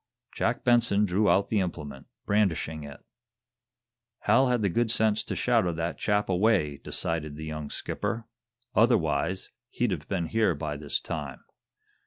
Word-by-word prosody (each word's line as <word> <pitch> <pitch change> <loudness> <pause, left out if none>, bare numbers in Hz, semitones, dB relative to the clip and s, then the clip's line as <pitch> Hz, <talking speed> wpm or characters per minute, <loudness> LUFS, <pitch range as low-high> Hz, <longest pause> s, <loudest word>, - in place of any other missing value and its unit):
Jack - - -1
Benson 120 -4 +4
drew 100 +2 +2
out 100 - +3
the 110 - +2
implement, 75 -7 -5 0.2
brandishing 85 -7 0
it. 70 -1 -10 1.2
"Hal 125 +6 +4
had 125 -3 +1
the - - +3
good 115 +5 +1
sense 110 -1 +2
to - - -4
shadow 115 -8 +2
that 85 +1 -3
chap 105 0 +1
away," 90 -7 +2
decided 75 -1 -3
the 80 +1 -7
young 75 -2 -5
skipper. 115 - -3 0.5
"Otherwise, 90 - +2 0.2
he'd 120 -4 0
have 75 -5 -4
been 90 -4 -1
here 110 -2 +1
by 75 0 -4
this 70 0 -2
time. 75 -5 -5
90 Hz, 150 wpm, -28 LUFS, 75-110 Hz, 1.2 s, Benson